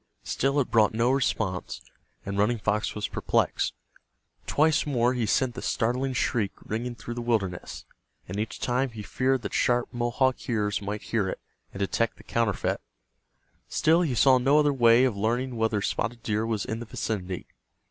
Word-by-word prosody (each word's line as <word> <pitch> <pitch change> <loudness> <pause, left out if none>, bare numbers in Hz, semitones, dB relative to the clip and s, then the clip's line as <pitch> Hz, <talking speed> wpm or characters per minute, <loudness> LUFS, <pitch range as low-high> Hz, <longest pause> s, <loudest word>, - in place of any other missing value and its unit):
Still 135 +2 0
it 135 - -1
brought 110 -1 +4
no 115 +3 +3
response, 110 -8 -1 0.5
and 100 - -3
Running 105 +4 +2
Fox 105 0 -1
was 105 -1 -2
perplexed. - - 0 0.7
Twice 155 +1 +2
more 125 -3 +2
he 120 -3 -1
sent 130 +1 +2
the - - -7
startling 125 +4 0
shriek 115 -6 0
ringing 120 +3 -3
through 120 +1 -7
the 120 - -4
wilderness, 105 -7 -2 0.4
and 95 +3 -4
each 110 - -3
time 130 +2 0
he 110 -3 -8
feared 130 +4 0
that - - -5
sharp 120 0 +1
Mohawk 120 +2 0
ears 105 -3 0
might 105 +1 -4
hear 105 -5 0
it, - - -5 0.3
and 100 - -7
detect 115 +4 0
the - - -15
counterfeit. 115 -4 0 0.9
Still 165 +2 +3
he 150 -8 0
saw 130 +3 +5
no 135 +4 +4
other 150 -1 +4
way 120 -1 +5
of 130 -5 +2
learning 120 +5 -1
whether 110 -2 0
Spotted 115 +3 -2
Deer 110 +1 0
was 110 -3 -1
in 110 - -3
the 120 - -7
vicinity. 95 -5 -4
115 Hz, 175 wpm, -27 LUFS, 105-130 Hz, 0.9 s, saw